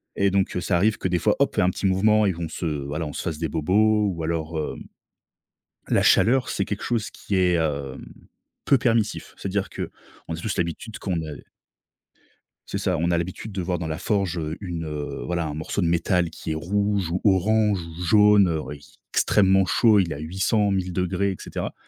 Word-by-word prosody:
et 100 0 +2
donc, 95 -1 0
heu, - - 0
ça 90 0 0
arrive 105 +5 +2
que, - - -2
des 90 -1 +1
fois, - - +2
hop! - - +4
On - - -13
fait - - +3
un 90 - +4
petit 100 - -5
mouvement 105 +3 +3
et 95 - 0
on 85 -1 -4
se 85 - -5 0.2
voilà, 75 +3 -3
on 75 - -7
se - - -4
fasse 80 - -3
des 80 - -1
bobos 105 +7 +2
ou 85 -2 -5
alors, 80 0 -2
heu, 75 - -3 1.1
la - - +3
chaleur, 125 +1 +4
c'est - - -1
quelque 105 - -4
chose 115 -3 -1
qui 100 - -5
est, 90 -1 +3
hem, 70 -5 -2 0.6
peu 140 - +5
permissif. 115 -3 0
C'est-à-dire 95 0 -2
qu'on 80 - -8
a - - -4
tous 95 +5 -3
l'habitude 90 +6 -3
qu'on 95 -3 -2
ne 80 -3 -5 1.3
C'est - - -2
ça, 95 -3 0
on 85 +2 0
a 85 - +2
l'habitude 95 +5 -5
de 95 - -2
voir 90 -1 -2
dans 80 - -3
la 80 - -3
forge, 95 -3 -1
heu, 80 +1 -4
une 85 -4 -5 0.4
voilà, 85 -2 -1
un 75 - -4
morceau 80 +6 -4
de 85 - +1
métal 85 0 +1
qui 80 - -6
est - - 0
rouge 100 +2 -1
ou 90 - -1
orange, 105 +1 +3
ou 85 +1 -9
jaune, 100 -3 +5
oui, 75 - -7
qui - - -20 0.2
extrêmement 95 -1 +4
chaud. 110 +1 +4
Il 90 -4 +1
est - - -3
à - - -8
800-1000°, 95 +1 0
et - - -4
cetera, - - -5
90 Hz, 210 wpm, -24 LUFS, 85-100 Hz, 1.3 s, peu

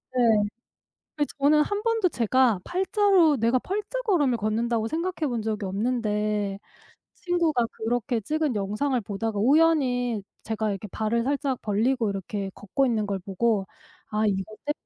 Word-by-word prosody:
네. 225 -4 +4 0.7
근데 295 -2 0
저는 300 +2 +5
한 410 +6 -2
번도 450 -5 +2
제가 240 - +2
8 370 +2 -1
자로 380 -8 +4
내가 235 +2 +2
8 390 +10 -2
자걸음을 365 - +1
걷는다고 225 +1 0
생각해 335 +3 -2
본 240 -4 -2
적이 215 -1 -2
없는데 210 -1 -1 0.6
친구가 335 -9 +1
그렇게 235 +1 -1
찍은 300 +4 -1
영상을 210 +7 0
보다가 210 +1 -3
우연히 250 -4 +3 0.2
제가 220 -1 -2
이렇게 200 +1 -5
발을 220 +4 -1
살짝 275 -2 -1
벌리고 225 +2 +1
이렇게 195 0 -4
걷고 240 +7 0
있는 220 -4 0
걸 200 -1 -2
보고 200 +2 0 0.4
'아 215 0 +1
이거 200 +1 -2
때문에 295 - 0
235 Hz, 305 characters per minute, -26 LUFS, 210-290 Hz, 0.7 s, 저는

